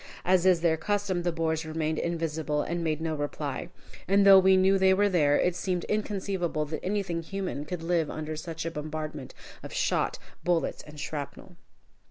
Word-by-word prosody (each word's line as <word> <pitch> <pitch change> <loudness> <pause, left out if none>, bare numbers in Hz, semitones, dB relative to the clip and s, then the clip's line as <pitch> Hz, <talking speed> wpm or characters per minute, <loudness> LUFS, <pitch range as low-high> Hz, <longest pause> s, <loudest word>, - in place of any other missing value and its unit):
As 185 0 +4
is 180 -3 +4
their 165 -1 +3
custom, 200 +1 -1
the 175 0 0
Boers 160 -1 -1
remained 155 0 -2
invisible 160 -3 -1
and 170 +1 -3
made 155 -1 -1
no 160 -1 -1
reply. 145 +2 -4 0.4
And 200 +2 +4
though 195 -1 +10
we 190 0 +5
knew 190 +1 +4
they 190 0 +5
were 205 +1 +3
there, 150 -6 +3
it 180 -1 +1
seemed 180 -1 -2
inconceivable 190 -6 -1
that 155 +1 -5
anything 190 -4 -1
human 180 -4 -4
could 165 +1 -5
live 165 -2 +1
under 155 0 -4
such 165 +1 -5
a 165 - -2
bombardment 155 -2 -6 0.3
of - - -9
shot, - - 0 0.3
bullets, 175 -2 0
and 150 0 -11
shrapnel. 145 -2 -6
165 Hz, 180 wpm, -28 LUFS, 155-185 Hz, 0.4 s, though